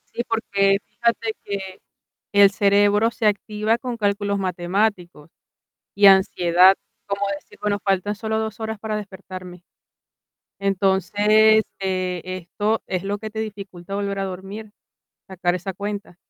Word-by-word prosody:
Sí, 240 - -1
porque 200 -3 +1
fíjate 230 -1 -1
que 195 -2 -6 0.5
el 200 -1 +7
cerebro 205 +2 +3
se 225 - -1
activa 210 +2 0
con 245 -1 -5
cálculos 200 -1 0
matemáticos, 180 -3 -2 0.6
y 200 0 +5
ansiedad, 185 -1 +6 0.3
como 200 0 -3 0.2
decir: - - -20
"Bueno, 205 -1 0
faltan 195 +1 0
solo 220 +1 -2
2 220 -1 -4
horas 220 -1 -5
para 215 0 -3
despertarme". 185 -3 -9 1.0
Entonces, 205 +3 +3 0.2
eh, 185 -2 -2
esto 185 +4 -2
es 185 0 -2
lo 200 +1 -2
que 215 +1 -7
te 220 - -7
dificulta 195 -4 -6
volver 200 0 -2
a 195 - -1
dormir, 195 +3 -7 0.6
sacar 180 -2 -1
esa 190 +2 -4
cuenta. 200 -1 -6
200 Hz, 135 wpm, -22 LUFS, 190-215 Hz, 1.0 s, el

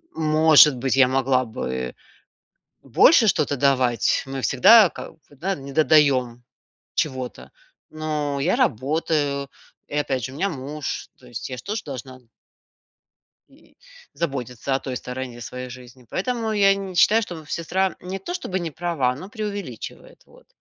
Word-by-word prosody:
может 155 -1 +6
быть, 130 +2 -1
я 135 -2 +6
могла 130 0 +1
бы 65 - -4 0.9
больше 220 - +5
что-то 170 -6 +1
давать. 125 -4 +2
Мы 135 0 -5
всегда 190 - +6
ка - - -9
вот, 145 -3 -24 0.2
не 135 0 -9
додаем 135 -6 +3 0.5
чего-то. 130 - -3 0.4
Ну, 150 -2 -3
я 175 +7 +1
работаю, 140 +2 0 0.4
и - - -2
опять 130 -4 -2
же 130 - -5
у - - -10
меня 190 +6 0
муж. 145 0 -5
То 125 - -18
есть 120 +1 -7
я 125 - -5
ж 120 - -9
тоже 210 +1 -3
должна 130 -2 -8 1.3
и, - - -24 0.4
заботиться 135 -4 -3
о 135 - 0
той 130 -2 -5
стороне 125 -1 -6
своей 125 +2 -7
жизни. 125 0 -13
Поэтому 230 +3 -2
я 200 -2 +4
не 195 -2 -6
считаю, 220 +5 +5
что 175 -6 -7
сестра 180 +4 -1
не 185 +2 -5
то 195 - -6
чтобы 190 - -3
не 170 -3 -4
права, 155 -7 -1
но 180 +9 -9
преувеличивает. 200 - -7
Вот. - - -21
140 Hz, 150 wpm, -23 LUFS, 130-170 Hz, 1.3 s, может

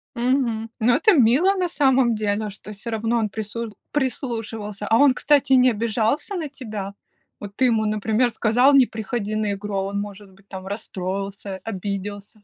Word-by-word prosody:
Мгм. 235 -3 0
Ну 240 +2 +3
это 330 +9 +4
мило 295 - +4
на 365 -2 0
самом 265 -7 +3
деле, 210 0 -1
что 210 +1 -10
всё 215 +3 -7
равно 225 +1 0
он 215 -2 0
прису 220 +1 -5 0.2
прислушивался. 225 -7 -3
А 225 - +4
он, 285 0 +6
кстати, 280 0 +2
не 255 -1 +6
обижался 230 - -1
на 320 -5 -3
тебя? 210 -7 -6 0.5
Вот 200 -1 -9
ты 260 - +2
ему, 225 -3 +2
например, 215 +3 +1
сказал: 240 +5 +3
"Не 265 -2 +7
приходи 220 -1 -4
на 215 -1 0
игру!" 200 0 -5
А 195 - +1
он, 200 +1 -3
может 205 -1 -7
быть, 195 +1 -23
там 190 -1 -8
расстроился, 195 -1 -5
обиделся. 205 0 -6
220 Hz, 175 wpm, -22 LUFS, 205-250 Hz, 0.5 s, Не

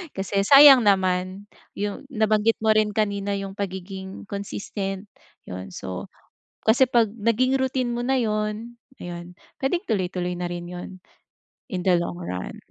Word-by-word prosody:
kasi 195 +1 0
sayang 275 0 +9
naman 185 0 +1 0.3
yung 205 +4 -3
nabanggit 220 -1 +2
mo 220 0 +3
rin 215 -1 +3
kanina 200 -2 0
yung 195 0 -6
pagiging-consistent, 195 +1 -5 0.4
yun. 95 +1 -7
So 90 0 -6 0.6
kasi 235 +4 +6
pag 235 -3 +4
naging 235 +4 +1
routine 260 -2 0
mo 240 - -2
na 265 0 +2
yun, 215 +1 -2 0.3
ayun 175 0 -7 0.3
pwedeng 345 +7 0
tuloy-tuloy 180 -3 -1
na 180 - -2
rin 175 0 -5
yun, 180 0 -7 0.8
in 180 -1 -3
the 185 -2 +5
long 175 - -4
run. 90 - -5
200 Hz, 135 wpm, -24 LUFS, 185-225 Hz, 0.8 s, sayang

